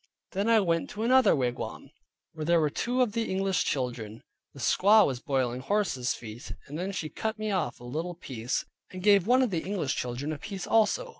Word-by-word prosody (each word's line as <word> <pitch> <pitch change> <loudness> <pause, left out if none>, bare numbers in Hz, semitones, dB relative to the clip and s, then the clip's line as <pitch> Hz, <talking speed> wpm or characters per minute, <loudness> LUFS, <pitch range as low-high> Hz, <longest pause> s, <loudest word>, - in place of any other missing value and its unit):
Then 200 +3 0
I 230 -1 +6
went 170 -4 0
to 215 +1 -5
another 255 -2 +5
wigwam, 125 -3 -3 0.4
where 155 -1 -5
there 170 +2 +3
were 150 -2 +1
two 250 - +1
of 235 - -1
the 225 +1 -2
English 190 -1 0
children; 120 -5 -3 0.3
the - - -14
squaw 210 +3 +5
was 130 -3 -2
boiling 130 -4 -1
horses 135 -8 0
feet; 110 -1 -8
then 175 +7 -4
she 170 -5 -3
cut 220 +7 -3
me 215 0 -2
off 175 -11 -1
a - - -13
little 160 +8 -4
piece, 125 -7 -3 0.2
and 185 -1 -8
gave 200 -2 +5
one 255 +2 +5
of 245 - 0
the 170 -3 -1
English 185 -8 -2
children 125 +5 -3
a 150 - -7
piece 195 +1 -6
also. 225 - +2
170 Hz, 205 wpm, -28 LUFS, 130-210 Hz, 0.4 s, I